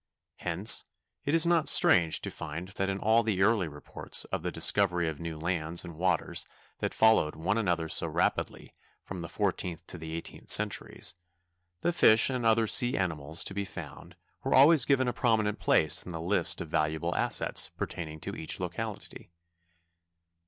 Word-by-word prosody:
Hence 90 +6 +2 0.4
it 145 - +1
is 165 0 +6
not 170 -2 +3
strange 85 -3 +4
to - - -5
find 80 +4 -7
that 95 0 -3
in 95 - -2
all 110 +3 +2
the 105 -4 0
early 105 -4 +2
reports 75 -1 -4
of - - -2
the - - -4
discovery 90 -4 +2
of 80 -2 -5
new 85 -1 -6
lands 85 0 -2
and 85 - -9
waters 90 +1 -1 0.4
that - - -2
followed 110 -9 +3
one 85 +6 -1
another 90 -7 -1
so - - +1
rapidly - - -2 0.3
from 90 -2 -8
the 85 - -7
fourteenth 90 -4 -3
to 90 - -6
the 80 0 -8
eighteenth 85 - -9
centuries, - - +3 0.7
the 175 - 0
fish 110 -5 +5
and 125 -3 -1
other 110 0 +3
sea 120 +4 +1
animals 80 -4 -3
to - - -4
be 100 +1 -3
found 95 - -10 0.3
were - - +1
always 140 0 +6
given 130 -2 +2
a 120 - -1
prominent 110 -3 0
place 80 +1 +3
in 90 - -8
the 80 - -6
list 90 +5 0
of - - -6
valuable 75 0 -1
assets - - +1
pertaining 80 -2 -6
to - - -6
each - - -4
locality. - - -6
95 Hz, 175 wpm, -28 LUFS, 80-110 Hz, 0.7 s, is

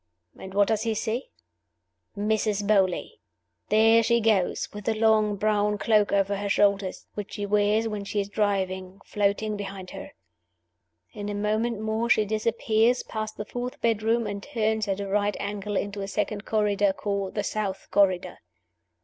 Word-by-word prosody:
And 190 0 -10
what 200 0 +4
does 220 -1 +1
he 225 -1 -1
see? 230 +4 -2 0.9
Mrs. 210 0 0
Beauly! 200 - +1 0.5
There 225 +2 +5
she 235 +1 +3
goes, 215 -5 +1
with 205 -1 -8
the 225 - +1
long 215 -1 +3
brown 210 0 +1
cloak 210 0 +2
over 200 0 +1
her 200 0 -3
shoulders, 200 -1 +1
which 205 -1 -6
she 205 -1 -3
wears 210 +2 +2
when 210 -2 -4
she 205 +1 -2
is 200 - -1
driving, 190 -2 -1
floating 210 +1 0
behind 195 -2 -7
her. - - -9 1.0
In 205 0 -5
a 205 - -3
moment 215 +2 -1
more 220 +2 -1
she 215 -2 +4
disappears, 220 +2 +1
past 215 -1 -5
the 210 - -4
fourth 245 +2 -5
bedroom, 230 +1 +1
and 200 -1 -4
turns 220 -4 -1
at 195 0 -1
a 200 - -3
right 205 +1 0
angle, 205 0 -3
into 200 +1 -3
a 195 - -4
second 210 +1 -2
corridor, 205 -2 +2
called 200 -1 -3
the 205 - 0
South 200 -3 -3
Corridor. 185 -3 +2
210 Hz, 165 wpm, -26 LUFS, 200-220 Hz, 1.0 s, There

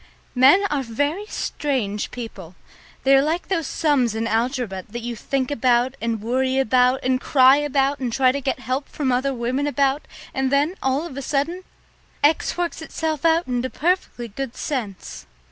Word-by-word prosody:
Men 275 +11 +6
are 290 -2 +1
very 285 - -2
strange 245 - -2
people. 195 -8 -8 0.5
They 270 0 +5
are 270 - +6
like 320 +6 -2
those 330 -7 0
sums 265 -8 +1
in 225 +1 -1
algebra 230 -4 -1
that 240 +3 -6
you 240 0 -4
think 260 +4 -2
about 250 -1 +2
and 230 -1 -1
worry 260 +3 0
about 255 0 +3
and 255 0 +1
cry 265 0 +6
about 280 -1 +1
and 250 -3 -2
try 255 +2 +3
to 280 +2 -3
get 265 -1 -2
help 260 +2 -3
from 275 -4 -1
other 260 +3 +1
women 255 +3 -1
about, 280 0 +1 0.3
and 265 0 0
then, 285 +5 +2
all 265 +4 0
of 280 -6 -8
a - - -3
sudden, 320 +6 -1 0.6
X 305 +4 +2
works 345 -2 -2
itself 315 -1 -3
out 330 +1 +3
into 250 0 -2
perfectly 330 -8 -1
good 240 +3 -6
sense. 220 - -5
265 Hz, 175 wpm, -22 LUFS, 245-290 Hz, 0.6 s, Men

